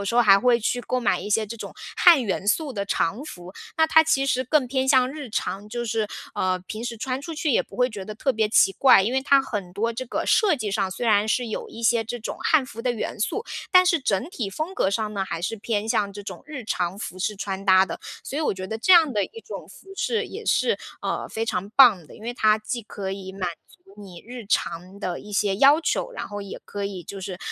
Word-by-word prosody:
有 200 - -3
时 230 - -2
候 240 - +6
还 195 -2 +7
会 240 +1 +3
去 245 +2 -1
购 255 +1 -2
买 230 - +1
一 - - -6
些 215 +1 +2
这 230 +3 -7
种 - - -8 0.2
汉 335 -7 +7
元 200 0 -2
素 290 +4 +1
的 200 -3 -3
常 200 +8 0
服。 180 - -10 0.2
那 320 - +4
它 320 0 +6
其 280 -4 +2
实 255 -1 +1
更 270 0 +2
偏 265 +1 -1
向 260 -1 +4
日 290 -4 -7
常， 205 -1 -3
就 240 +2 -4
是， 220 -1 -1 0.3
呃， 185 0 0
平 215 +2 -6
时 235 -1 -4
穿 255 +4 -3
出 325 +2 -7
去 300 0 -1
也 - - +3
不 - - -15
会 250 0 +2
觉 205 -3 -7
得 215 - -7
特 265 +5 0
别 220 -1 +1
奇 195 -3 +4
怪。 255 -6 +6
因 230 +6 -1
为 265 - +2
它 275 -1 +4
很 205 -9 -5
多 230 +3 0
这 255 +2 -5
个 - - -2
设 400 -9 +4
计 215 -4 -3
上， 195 -2 0
虽 235 +5 -4
然 210 -1 +4
是 245 +2 +1
有 - - -5
一 230 - -10
些 230 0 +3
这 240 +2 -5
种 220 - -6
汉 310 -4 +3
服 230 -3 -9
的 250 +1 0
元 220 - -4
素， 435 - -1 0.3
但 365 -1 +7
是 340 -3 +2
整 200 0 0
体 235 - -3
风 310 - -4
格 190 - +1
上 215 0 -2
呢 195 -2 -2
还 165 -3 -5
是 225 - -1
偏 210 0 -2
向 200 -2 +1
这 205 +1 -8
种 190 -3 -8
日 280 -6 -7
常 185 -2 -2
服 185 -3 -6
饰 210 +3 -2
穿 195 0 -4
搭 190 -1 +6
的。 - - -7 0.2
所 285 - -4
以 - - 0
我 290 - 0
觉 185 0 -6
得 220 +3 -4
这 245 - 0
样 325 -6 +6
的 205 -2 +1
一 455 - -10
种 - - -8
服 390 - -16
饰 455 - 0
也 - - -9
是， 470 - +2 0.2
呃， - - -2
非 225 +1 -3
常 200 -2 -3
棒 215 - +7
的。 - - -14
因 215 - -15
为 240 +2 -3
它 215 -2 +4
既 235 +3 -4
可 195 -2 -6
以 190 -1 -7
满 185 -2 -3 0.2
足 380 - -19
你 185 -4 -11
日 245 -3 -8
常 185 -1 -2
的 180 -4 -4
一 210 - -12
些 200 -1 +1
要 280 +6 +6
求， - - -1
然 - - -5
后 205 -1 -6
也 200 - -7
可 200 -1 -5
以 190 -3 -6
就 195 +3 -8
是， 185 -1 -6
220 Hz, 285 characters per minute, -24 LUFS, 200-260 Hz, 0.3 s, 还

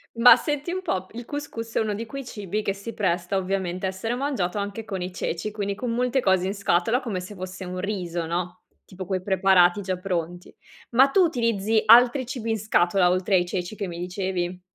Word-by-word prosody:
Ma 230 +2 +9
senti 295 +3 -3
un 370 - -3
po', 185 - -2
il 240 +1 -6
cous 290 +4 -5
cous 230 0 -7
è - - +3
uno 215 -2 0
di 220 +3 -4
quei 275 +3 -7
cibi 210 -2 -4
che 200 - -1
si 200 +4 -8
presta 180 -2 0
ovviamente 185 -1 -2
a - - +1
essere 190 +5 -3
mangiato 245 -9 -2
anche 205 +2 -4
con 195 -4 -5
i 180 +1 -5
ceci, 180 +3 -3
quindi 200 -1 -3
con 235 +4 -4
molte 250 +2 +1
cose 190 -5 +2
in 195 - -2
scatola, 200 +3 +1
come 220 -8 -4
se 185 +3 -9
fosse 185 0 -7
un 180 0 -5
riso, 180 -4 -3
no, 175 +2 -4 0.2
tipo 185 -1 -9
quei 185 0 -2
preparati 190 -1 +4
già 185 -1 -2
pronti. 175 -1 -4 0.4
Ma 255 +3 +6
tu 375 +8 +3
utilizzi 225 - +1
altri 245 +4 +6
cibi 235 -2 -5
in 220 -1 0
scatola 185 -3 +3
oltre 185 +2 +1
ai 175 -1 +3
ceci 180 +3 -4
che 200 - -3
mi 170 -1 -7
dicevi? 180 0 -3
195 Hz, 215 wpm, -25 LUFS, 180-230 Hz, 0.4 s, Ma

